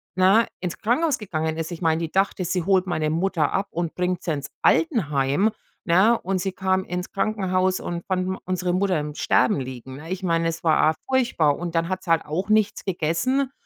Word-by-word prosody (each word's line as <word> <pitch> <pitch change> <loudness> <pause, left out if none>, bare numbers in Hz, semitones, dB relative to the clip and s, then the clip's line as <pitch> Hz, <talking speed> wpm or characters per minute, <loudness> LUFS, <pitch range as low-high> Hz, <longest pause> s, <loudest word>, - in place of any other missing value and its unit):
ne, 190 +5 +4
ins 180 -2 -4
Krankenhaus 265 +7 +1
gegangen 160 -5 -3
ist. 165 +2 -4
Ich 170 - -7
meine, 160 -1 +2
die 165 -1 -3
dachte, 195 -1 +1
sie 180 0 -1
holt 190 0 +2
meine 155 -3 0
Mutter 170 -2 0
ab 195 +1 0
und 170 -1 -3
bringt 180 0 -1
sie 170 - -1
ins 140 -1 -4 0.2
Altenheim, 165 - +2 0.3
ne? 195 +7 +4
Und 190 +1 -1
sie 190 +1 -2
kam 190 0 0
ins 180 +1 -4
Krankenhaus 190 -2 0
und 170 -1 -5
fand 185 -1 0
m 190 0 -2
unsere 185 -1 -1
Mutter 185 -2 +1
im 150 0 -6
Sterben 130 -1 +2
liegen, 130 0 -7
ne? 160 +4 -9
Ich 190 0 -4
meine, 165 -1 +1
es 165 - -6
war 160 -2 +4
a 160 - -7
furchtbar. 235 - +2
Und 175 -1 -5
dann 165 +1 +1
hat 185 0 -3
sie 170 - -2
halt 165 - +3
auch 175 +7 -3
nichts 215 -1 +2
gegessen. 190 - 0
180 Hz, 210 wpm, -23 LUFS, 160-195 Hz, 0.3 s, ne